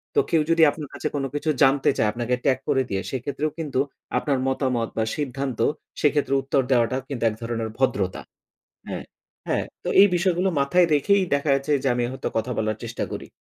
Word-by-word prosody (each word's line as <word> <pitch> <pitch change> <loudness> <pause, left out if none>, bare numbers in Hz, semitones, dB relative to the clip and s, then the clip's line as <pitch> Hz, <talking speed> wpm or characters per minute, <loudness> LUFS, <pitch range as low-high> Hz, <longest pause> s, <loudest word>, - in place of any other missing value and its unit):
তো - - +5
কেউ 165 - +3
যদি 165 0 +5
আপনার 150 -2 -8
কাছে - - -3
কোন 140 - -1
কিছু 145 +2 -1
জানতে 135 0 +4
চায় 105 - +2
আপনাকে 120 +2 -1
ট্যাগ 130 -2 +3
করে 135 - +3
দিয়ে, 95 0 -1
সেক্ষেত্রেও 145 +4 -2
কিন্তু 145 -5 -2 0.4
আপনার 140 +1 0
মতামত 130 -4 0
বা 110 - +2
সিদ্ধান্ত, 135 -3 -3 0.4
সেক্ষেত্রে 145 -2 +2
উত্তর 135 0 +1
দেওয়াটাও 130 +1 +2
কিন্তু 135 -5 -4
এক 105 - -6
ধরনের 115 -1 -3
ভদ্রতা 100 -8 0 0.7
হ্যাঁ, - - -5 0.4
হ্যাঁ, - - +1 0.2
তো - - -2
এই 200 - +9
বিষয়গুলো 180 +1 +1
মাথায় 175 +6 +4
রেখেই 200 +7 +3
দেখাচ্ছে 140 0 +1
যে, 135 - +1
আমি 120 - 0
হয়তো 130 - -4
কথা 115 +3 -1
বলার 110 -1 0
চেষ্টা 115 0 -3
করি। - - -6
135 Hz, 185 wpm, -24 LUFS, 120-150 Hz, 0.7 s, এই